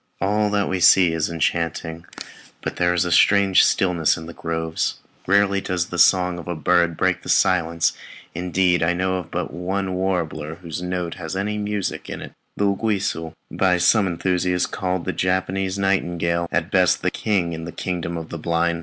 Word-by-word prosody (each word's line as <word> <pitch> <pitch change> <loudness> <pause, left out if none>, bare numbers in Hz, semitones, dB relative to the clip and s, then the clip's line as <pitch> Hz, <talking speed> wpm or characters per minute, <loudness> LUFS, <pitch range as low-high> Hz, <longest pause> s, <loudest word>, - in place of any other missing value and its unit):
All 105 +2 +1
that 100 -1 0
we 95 - -1
see 90 -1 +6
is 80 0 -1
enchanting, 85 0 -2 0.6
but - - -4
there 90 0 +2
is 90 0 +1
a 90 - -2
strange 100 0 +5
stillness 90 -4 +2
in 80 - -8
the 85 - -9
groves; 80 -1 -2 0.3
rarely 100 0 +3
does 90 -2 -2
the 90 - -4
song 90 0 +4
of 85 - -10
a 90 - -3
bird 85 +2 +2
break 95 -1 +1
the - - -10
silence; 85 -3 +2 0.4
indeed, 90 0 +1
I 80 +1 +2
know 90 -1 -2
but 85 -1 -4
one 95 +2 -2
warbler 85 -5 -2
whose 85 -1 -7
note 90 -1 -3
has 80 +2 -5
any 105 +2 -2
music 105 -2 -3
in - - -5
it, - - -9 0.3
the 100 - +1
uguisu, 100 -5 -1 0.2
by 90 -2 +2
some 100 +3 +3
enthusiasts 90 0 0
called 90 -2 -3
the - - -2
Japanese 95 +1 -1
nightingale 85 -3 0
at 85 +2 -1
best, 90 -2 +2
a - - +2
king 95 -6 -1
in 80 0 -6
the 85 - -6
kingdom 85 -2 -4
of 80 -1 -7
the 85 - -6
blind. 85 +1 0
90 Hz, 180 wpm, -22 LUFS, 85-95 Hz, 0.6 s, see